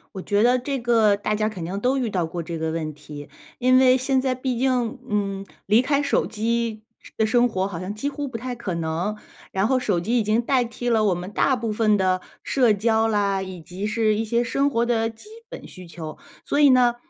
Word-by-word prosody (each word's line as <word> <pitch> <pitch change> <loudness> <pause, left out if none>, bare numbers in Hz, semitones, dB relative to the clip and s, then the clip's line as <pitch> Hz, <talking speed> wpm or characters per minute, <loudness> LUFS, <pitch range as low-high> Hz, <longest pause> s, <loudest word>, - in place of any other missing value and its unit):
我 190 - -4
觉 205 +3 +1
得 250 +1 +4
这 270 +2 -3
个 225 -4 +3
大 210 +1 -2
家 215 0 0
肯 185 -6 -6
定 190 +4 -4
都 255 +4 +1
遇 245 -5 -1
到 180 -4 -1
过 170 +1 -5
这 165 0 -5
个 160 0 -2
问 160 -1 -3
题， 145 0 -10 0.3
因 255 +1 +4
为 255 0 +6
现 260 +1 +1
在 260 -1 0
毕 255 -1 -3
竟， 255 -1 0
嗯， 195 -2 -2 0.2
离 215 +4 +5
开 280 +2 +1
手 - - +1
机 225 0 -2 0.3
的 220 - +2
生 240 +2 +3
活 190 -3 -1
好 180 -4 -6
像 190 +3 -5
几 280 +7 -3
乎 285 -1 -4
不 240 - -5
太 250 +2 -5
可 195 -7 -4
能。 170 +6 -2 0.4
然 195 +2 +1
后 260 +1 +2
手 200 -8 0
机 230 +8 0
已 - - +2
经 215 +3 +2
代 255 0 +2
替 240 +1 -4
了 220 -2 +3
我 190 -3 +3
们 180 +3 -7
大 265 +4 +2
部 225 -3 -3
分 215 -1 +2
的 185 -1 +1 0.2
社 245 -6 +3
交 220 +2 +2
啦， 200 -2 +1
以 185 -1 -6
及 185 +5 -5
是 215 -1 +1
一 220 - -1
些 235 +2 0
生 275 +4 +1
活 235 -3 +1
的 225 -2 +1
基 225 - -13 0.2
本 - - -9
需 185 -2 -12
求。 160 -2 -8 0.3
所 290 - 0
以 290 - +7
呢， 245 -2 +4
220 Hz, 255 characters per minute, -23 LUFS, 195-245 Hz, 0.4 s, 以